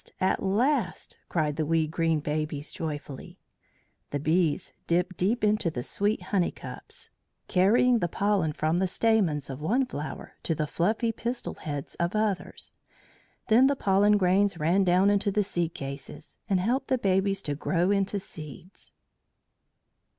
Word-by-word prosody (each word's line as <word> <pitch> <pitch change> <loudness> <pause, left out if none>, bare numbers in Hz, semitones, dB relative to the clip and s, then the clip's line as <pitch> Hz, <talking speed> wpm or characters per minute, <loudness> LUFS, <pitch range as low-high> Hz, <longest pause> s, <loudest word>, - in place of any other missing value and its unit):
at 190 - +1
last!" 235 +10 0
cried 150 -3 0
the 160 - +1
wee 165 0 +2
green 165 0 0
babies 150 0 -3
joyfully. 145 -4 -6 0.7
The 145 - -2
bees 155 0 +1
dipped 180 +2 +1
deep 210 +7 0
into 210 -4 +2
the 120 -6 -4
sweet 205 - -1
honey 185 -1 +1
cups, - - -8 0.4
carrying 230 +6 +4
the 175 - 0
pollen 195 -3 +1
from 155 +3 0
the 190 - +2
stamens 185 -8 +1
of 135 +1 -7
one 240 - +2
flower 155 -11 -7
to 165 - -1
the 155 - -1
fluffy 215 +9 0
pistil 240 +2 -4
heads 145 -2 -6
of 170 +4 0
others. 215 -3 -1 0.7
Then 245 +4 +6
the 280 - +2
pollen 205 -2 +3
grains 195 0 +2
ran 170 +5 +2
down 185 +2 +4
into 205 0 +2
the 210 +1 +1
seed 175 -4 -2
cases 140 +2 -8
and 190 -2 +3
helped 250 +8 0
the 260 - +2
babies 195 -2 +1
to 145 - -2
grow 175 +5 +1
into 200 0 +1
seeds. 160 0 -11
185 Hz, 150 wpm, -27 LUFS, 155-205 Hz, 0.7 s, Then